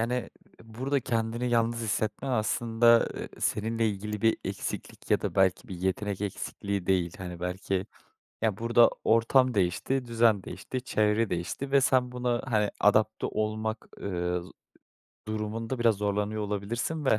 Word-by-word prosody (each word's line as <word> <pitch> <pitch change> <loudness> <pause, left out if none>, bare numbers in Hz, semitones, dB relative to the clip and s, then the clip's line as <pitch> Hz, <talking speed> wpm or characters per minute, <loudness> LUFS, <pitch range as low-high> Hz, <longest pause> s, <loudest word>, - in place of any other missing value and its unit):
Yani 125 +2 -1 0.3
burada 130 +5 -2
kendini 115 0 -1
yalnız 115 0 +2
hissetmen 110 +3 -1
aslında, 115 +1 +3
eee, - - -5
seninle 115 +1 0
ilgili 105 +1 -4
bir 115 0 +4
eksiklik - - -5
ya - - +4
da - - -3
belki 95 +5 +2
bir 95 - -5
yetenek 95 +2 -2
eksikliği 100 -1 -3
değil. 90 -3 +2
Hani 90 -2 -7
belki 95 +1 -2 0.6
ya, 110 -3 +1
burada 115 +1 +5
ortam 125 +3 +4
değişti, 105 +7 0
düzen 115 -4 +3
değişti, 130 -1 -5
çevre 110 -2 +1
değişti 90 +10 -3
ve 140 -1 +5
sen 130 -2 +3
buna 125 -1 -1
hani, 105 -5 +1
adapte 110 +1 +3
olmak, 110 +1 -2
eee, 90 -2 -1
z 85 - -12 0.8
durumunda 110 +3 -3
biraz 115 -2 +4
zorlanıyor 105 +1 -1
olabilirsin 110 +10 -2
ve 110 -5 +4
110 Hz, 145 wpm, -28 LUFS, 100-120 Hz, 0.8 s, burada